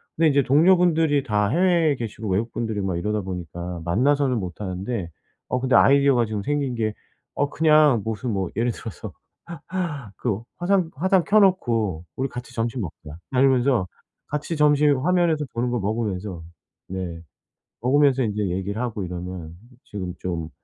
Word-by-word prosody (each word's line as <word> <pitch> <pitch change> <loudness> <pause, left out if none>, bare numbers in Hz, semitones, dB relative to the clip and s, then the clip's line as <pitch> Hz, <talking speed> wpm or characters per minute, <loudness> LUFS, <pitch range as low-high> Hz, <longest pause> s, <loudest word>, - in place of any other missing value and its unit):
근데 165 0 +3
인제 140 -1 +3
동료분들이 160 -1 +4
다 105 -5 +1
해외에 170 - +3
계시고 110 -3 -5
외국 105 +5 0
분들이고 105 -4 -2
막 90 - -1
이러다 105 +4 -1
보니까 90 -2 -6
만나서는 130 +6 +2
못하는데 95 +2 -4 0.4
어 125 - 0
근데 130 -1 +1
아이디어가 140 -3 +5
지금 105 -2 -4
생긴 140 -2 -1
게 110 -2 -1 0.5
어 145 - +2
그냥 150 -7 +4
무슨 110 +2 -3
뭐 95 -2 -1
예를 120 +3 +1
들어서 115 -3 -8 1.0
그 110 -4 -2 0.2
화상 175 -2 +1
화상 185 +3 +2
켜 215 +1 +5
놓고 115 - +2
"우리 135 - 0
같이 125 0 -8
점심 115 +1 -2
먹자." 80 -3 -8
막 125 - +1
이러면서 130 -6 +3 0.4
같이 150 +3 -3
점심 150 -1 +4
화면에서 170 -1 +2
보는 120 +1 -1
거 120 - 0
먹으면서 100 -4 -3 0.5
네. 90 -3 -5 0.6
먹으면서 135 +1 +3
인제 105 -2 -1
얘기를 95 +4 -3
하고 115 -5 -3
이러면 90 -2 -7 0.3
지금 95 -3 -5
좀 85 -3 -4
120 Hz, 335 characters per minute, -23 LUFS, 95-145 Hz, 1.0 s, 아이디어가